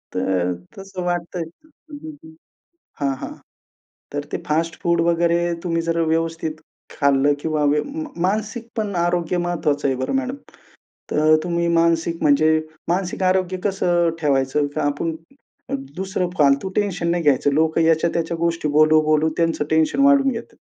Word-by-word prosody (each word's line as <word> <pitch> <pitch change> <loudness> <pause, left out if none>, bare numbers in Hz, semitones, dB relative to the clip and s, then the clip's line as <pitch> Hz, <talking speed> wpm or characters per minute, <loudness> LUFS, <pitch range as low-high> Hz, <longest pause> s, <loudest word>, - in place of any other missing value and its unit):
तर 90 -1 0 0.2
तसं 195 -1 -7
वाटतंय 175 0 -2
अ, 165 - -16 0.3
हं, 300 +2 -8
हं. 320 0 -14 0.7
हां, 140 -1 +1
हां. - - -6 0.8
तर 145 0 -3
ते - - 0
फास्टफूड 165 +2 0
वगैरे 170 0 +2
तुम्ही 165 -1 0
जर 165 0 -1
व्यवस्थित 165 -1 -1 0.4
खाल्लं 140 0 +3
किंवा 155 -1 -1
व्यव 145 +1 +2
म 310 +3 -5 0.2
मानसिक 215 +5 -2
पण 210 -3 -2
आरोग्य 175 0 0
महत्वाचं 160 -5 0
आहे 135 - 0
बरं 130 - -2
मॅडम. 265 0 -2 0.8
तर 155 +1 +4
तुम्ही 170 -1 0
मानसिक 165 0 +1
म्हणजे 155 +2 +4 0.3
मानसिक 185 +1 -1
आरोग्य 185 0 +1
कसं 175 -4 +1
ठेवायचं? 140 0 +1
का - - 0
आपुन 145 +3 -1 0.8
दुसरं 190 -1 -2
फालतू 140 +4 +3
टेन्शन 180 -5 0
नाही 175 0 0
घ्यायचं. 145 -1 +3
लोकं 160 +2 +2
याच्या 165 +1 +3
त्याच्या 165 0 -2
गोष्टी 165 -1 -1
बोलू, 155 +1 +5
बोलू 155 +1 +2
त्यांचं 165 -3 +1
टेन्शन 160 - +2
वाढून 280 -1 +5
घेतात. 235 -1 -7
165 Hz, 150 wpm, -21 LUFS, 155-180 Hz, 0.8 s, बोलू